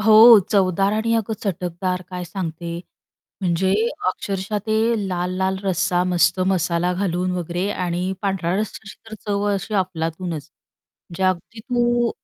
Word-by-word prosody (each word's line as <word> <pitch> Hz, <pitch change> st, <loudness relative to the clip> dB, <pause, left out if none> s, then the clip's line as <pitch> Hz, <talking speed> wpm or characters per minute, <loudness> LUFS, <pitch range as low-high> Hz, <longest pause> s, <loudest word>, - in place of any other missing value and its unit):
हो, 220 Hz, +1 st, +9 dB
चवदार 195 Hz, 0 st, +2 dB
आणि 220 Hz, +2 st, +1 dB
अगं 225 Hz, -1 st, 0 dB
चटकदार 180 Hz, -1 st, -2 dB
काय 180 Hz, -1 st, -4 dB
सांगते 170 Hz, -2 st, -5 dB, 0.6 s
म्हणजे 185 Hz, +1 st, +1 dB, 0.3 s
अक्षरशः 195 Hz, +2 st, -2 dB
ते 215 Hz, -, +1 dB, 0.3 s
लाल-लाल 185 Hz, +1 st, -1 dB
रस्सा 180 Hz, -1 st, +1 dB
मस्त 180 Hz, 0 st, +2 dB
मसाला 180 Hz, -1 st, +1 dB
घालून 180 Hz, -1 st, -1 dB
वगैरे 175 Hz, +2 st, -2 dB
आणि 180 Hz, -1 st, -2 dB
पांढऱ्या 190 Hz, -3 st, 0 dB
रस्साची 200 Hz, -2 st, -5 dB, 0.2 s
तर -, -, -5 dB
चव 205 Hz, -1 st, 0 dB
अशी 200 Hz, +2 st, -3 dB
अफलातूनच. 165 Hz, -4 st, -2 dB, 0.6 s
म्हणजे 170 Hz, +2 st, -5 dB
अगदी 185 Hz, +4 st, -1 dB
तू 240 Hz, 0 st, +1 dB
185 Hz, 130 wpm, -22 LUFS, 175-200 Hz, 0.6 s, हो